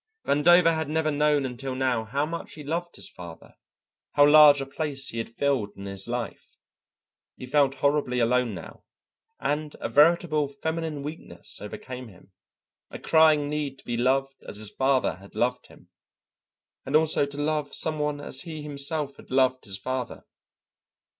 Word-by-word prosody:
Vandover 165 +3 +5
had 160 -2 -2
never 155 0 +1
known 150 -1 +2
until 130 +1 -5
now 130 -4 0
how 140 +7 -1
much 165 +2 -6
he 150 - -9
loved 170 +4 -3
his - - -9
father, 85 -2 -12 0.6
how 145 - +6
large 150 -1 +8
a 135 - -3
place 140 -1 -4
he 115 - -5
had 115 - -4
filled 120 -4 -1
in 100 - -8
his 100 +1 -5
life. 120 -1 -5 0.8
He - - -9
felt 140 0 +2
horribly 140 -2 +1
alone 120 -2 +1
now, - - -11 0.6
and 150 0 -2
a - - -3
veritable 155 -1 +4
feminine 160 +1 -4
weakness 145 - -9
overcame 125 +4 -7
him, 95 -2 -18 0.6
a - - -7
crying 155 -2 +4
need 145 -2 -3
to - - -20
be 120 - -2
loved 135 +3 0
as - - -6
his 105 -1 -4
father 130 -6 +1
had 100 +2 -16
loved 125 +3 -1
him, - - -19 0.9
and 145 - -2
also 155 -2 +3
to 140 0 -10
love 150 0 -1
some 155 -1 -1
one 150 -1 -1
as 140 -2 -3
he 160 -3 -7
himself 145 0 -3
had - - -15
loved 130 -1 +2
his 100 -2 -5
father. 130 +2 -5
140 Hz, 165 wpm, -26 LUFS, 125-150 Hz, 0.9 s, large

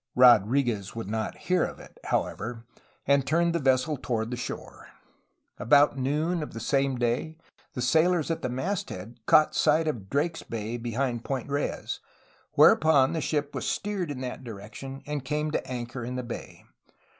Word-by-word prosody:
Rodriguez 120 -3 +4
would 115 -3 -5
not 110 +1 -3
hear 180 0 +1
of - - -4
it, - - -15
however, 115 +2 -2 0.4
and 140 0 +4
turned 170 +4 +2
the 170 - +1
vessel 135 +2 +2
toward 115 -2 -2
the - - -1
shore. 120 - -7 0.7
About 145 +4 +5
noon 150 +6 0
of 150 - -6
the 115 - -6
same 135 +3 +1
day 120 +7 -1 0.4
the 125 - -2
sailors 160 +5 +3
at 165 - -2
the 130 - -2
mast 175 +11 -2
head 110 +7 -8
caught 155 - +5
sight 155 +1 +3
of 110 -10 -3
Drake's 160 +4 0
Bay 115 +1 -4
be 120 -1 -5
hind 120 -2 -1
Point 135 -1 -3
Reyes, 145 +1 -2 0.5
whereupon 150 -2 +5
the 160 - -1
ship 145 0 -1
was - - -3
steered 195 -5 -2
in 135 -3 -5
that 130 +1 -5
direction 115 +5 -8
and 145 -2 -3
came 150 +2 -1
to - - -1
anchor 120 0 -5
in 125 +2 -4
the 125 - -3
bay. 120 - -8
135 Hz, 175 wpm, -27 LUFS, 120-150 Hz, 0.7 s, About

